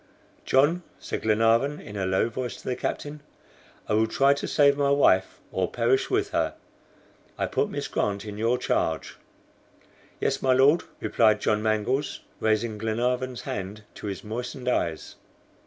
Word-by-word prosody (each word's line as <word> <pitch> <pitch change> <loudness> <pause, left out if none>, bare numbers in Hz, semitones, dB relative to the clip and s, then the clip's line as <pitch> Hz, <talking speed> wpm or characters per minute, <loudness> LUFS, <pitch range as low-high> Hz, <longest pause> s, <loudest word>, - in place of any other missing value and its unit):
"John!" 150 +7 +3 0.2
said - - -5
Glenarvan 115 +6 +2
in 105 - -10
a 95 -2 -1
low 95 +4 +2
voice 125 +2 -5
to - - -13
the 125 - 0
captain, 145 +3 -4 0.7
"I - - 0
will 110 +1 +3
try 135 +5 +4
to 140 - -4
save 140 -1 +4
my 140 -1 +1
wife 140 -10 +3
or 95 -1 -1
perish 120 +2 +1
with - - 0
her. - - 0 0.8
I - - 0
put - - 0
Miss - - -4
Grant 100 0 -1
in 105 0 -7
your 115 +3 +2
charge." 80 -9 -1 1.0
"Yes, - - 0
my 130 -1 +3
Lord," 140 +6 +5 0.2
replied 110 -2 +3
John 105 0 +1
Mangles, 110 +6 0 0.2
raising 110 0 0
Glenarvan's 125 +3 -1
hand 105 -2 -5
to - - -8
his 100 -2 -5
moistened 125 +4 -5
eyes. 85 -10 -1
115 Hz, 155 wpm, -26 LUFS, 105-130 Hz, 1.0 s, Lord